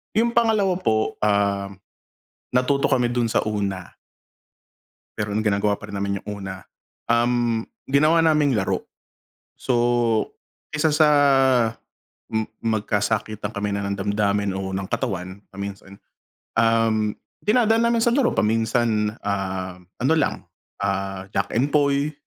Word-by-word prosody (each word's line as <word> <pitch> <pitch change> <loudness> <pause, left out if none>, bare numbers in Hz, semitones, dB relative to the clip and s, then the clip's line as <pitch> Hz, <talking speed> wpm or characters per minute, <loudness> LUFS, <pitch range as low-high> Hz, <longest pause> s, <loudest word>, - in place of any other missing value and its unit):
'Yung 235 +2 +3
pangalawa 215 -5 +3
po, 110 -12 0
um, 100 -1 +1 0.9
natuto 140 +2 +2
kami 125 -3 +1
dun 120 -1 +1
sa 110 - +1
una. 100 -4 -3 1.3
Pero 105 -1 -2
ang 105 - 0
ginagawa 100 -1 +1
pa 105 - -10
rin 100 - -6
naman 100 0 -2
'yung - - -15
una, 95 -1 -7 0.4
um, 120 -1 +2 0.3
ginawa 155 +4 +4
naming 150 -5 +3
laro. 95 - -1 0.7
So, 130 - -1 1.0
kaysa 150 +1 +2
sa 150 +1 +5 1.2
ma 110 -1 0 0.3
magka-sakitang 105 0 -2
kami 105 0 -2
na 100 - -3
ng 100 0 -1
damdamin 100 -1 0
o 95 0 -4
ng 95 0 -3
katawan, 95 +1 -4
paminsan, 100 0 -8 0.5
um, 115 -2 +2 0.2
dinadaan 225 +1 +3
namin 235 -1 +2
sa 235 - +3
laro, 255 -1 +3
paminsan, 110 -1 +1
ah, 95 -2 -3 0.2
ano 135 +6 +2
lang, 155 -3 0 0.4
ah, 95 -1 -2
Jack 100 +1 -1
en 140 +5 +1
Poy. 145 0 +2
110 Hz, 125 wpm, -23 LUFS, 100-140 Hz, 1.3 s, sa